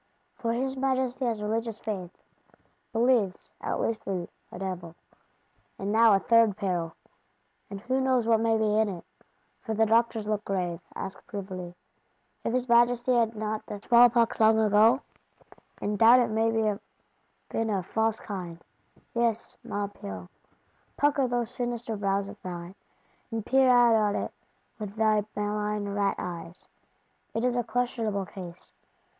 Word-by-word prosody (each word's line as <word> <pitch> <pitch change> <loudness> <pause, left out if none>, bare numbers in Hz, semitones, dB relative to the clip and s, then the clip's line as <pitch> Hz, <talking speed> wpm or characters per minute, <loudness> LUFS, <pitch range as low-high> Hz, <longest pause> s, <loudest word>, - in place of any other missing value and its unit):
For 230 - -2
his 265 +2 -2
Majesty 260 -1 0
has 225 -3 -1
religious 225 +1 -2
faith; 190 -5 -4 0.8
believes, 225 -5 +1
at - - -2
least 225 -1 -2
in 185 -3 -2 0.2
a - - -8
Devil. 180 -3 -5 0.8
And 195 +1 -3
now 225 -1 +6
a - - +3
third 230 -2 +4
peril; 175 -4 -2 0.7
and 200 -1 -7
who 260 +4 0
knows 255 -3 +2
what 225 -1 +4
may 225 0 +2
be 215 -1 +2
in 220 -1 +2
it! 180 -3 -7 0.6
For 220 -2 -3
the 225 +1 +4
Doctors 225 0 +2
look 210 -1 -1
grave; 180 -4 -2 0.2
ask 190 0 -6
privily, 185 -4 -6 0.7
If - - -1
his 255 +1 0
Majesty 240 +1 +4
had 230 -2 +2
not 215 0 -3
the 205 - -5
small 240 +3 +6
pox 235 -1 +1
long 220 0 +5
ago?—and 215 -1 0
doubt 235 +3 +8
it 240 - +1
may 225 +1 +2
have 210 -2 0 0.7
been 225 0 -1
a 195 -3 0
false 220 +3 0
kind. 180 -5 -6 0.5
Yes, 235 -2 -1
Maupeou, 100 - -5 0.7
pucker 285 -2 +2
those 240 -1 -1
sinister 240 -2 -3
brows 200 -1 0
of 205 +1 -11
thine, 175 0 -7 0.6
and 225 -3 -4
peer 265 0 +4
out 245 -2 +6
on 210 -2 +2
it - - -3 0.5
with 210 -1 -6
thy 215 -1 +3
malign 210 0 -2
rat 200 0 0
eyes: 170 0 -7 0.7
it 225 - 0
is 250 -1 +1
a 245 - +1
questionable 225 -4 -1
case. 180 -2 -10
220 Hz, 150 wpm, -28 LUFS, 200-235 Hz, 0.8 s, doubt